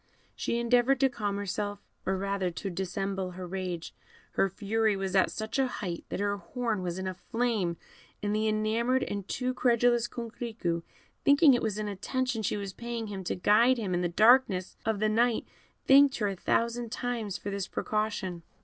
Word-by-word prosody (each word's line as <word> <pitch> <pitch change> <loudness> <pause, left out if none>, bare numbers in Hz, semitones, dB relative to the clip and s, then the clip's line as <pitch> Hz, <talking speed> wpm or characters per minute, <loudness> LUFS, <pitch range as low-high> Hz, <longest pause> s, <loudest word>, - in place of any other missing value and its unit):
She 235 - -1
endeavoured 245 +2 +3
to 270 - +5
calm 205 -5 -2
herself, 205 +1 -3 0.3
or 190 0 +1
rather 195 -1 -1
to 185 +3 -5
dissemble 190 +1 -3
her 185 0 -6
rage; 180 -2 -4 0.4
her 195 - +2
fury 215 +2 +1
was 195 0 -3
at 190 - +4
such 220 +4 -3
a 265 - +3
height 180 -8 -5
that - - -3
her 205 0 0
horn 230 -1 -2
was 175 -1 -3
in 190 - -4
a 185 - -2
flame, 215 -4 -1 0.5
and 205 0 0
the 215 +1 +1
enamoured 225 +4 +1
and 200 -5 -4
too 255 0 -1
credulous 240 -1 +3
Coquerico, 225 -8 -3 0.4
thinking 285 0 +6
it 245 - +2
was 215 -2 -1
an 215 0 -2
attention 240 +4 -2
she 210 - -1
was 200 -2 -5
paying 235 -1 -5
him 195 -2 -5
to - - -1
guide 225 +7 +4
him 200 -5 -2
in 175 - +1
the 175 - 0
darkness 215 -1 +4
of 220 -2 +1
the 215 - +2
night, 230 +2 +2 0.4
thanked 275 0 +6
her 210 -3 0
a 195 - -3
thousand 235 +4 0
times 240 -5 -3
for 200 - -5
this 200 -1 -3
precaution. 210 -5 -2
215 Hz, 185 wpm, -29 LUFS, 190-235 Hz, 0.5 s, thinking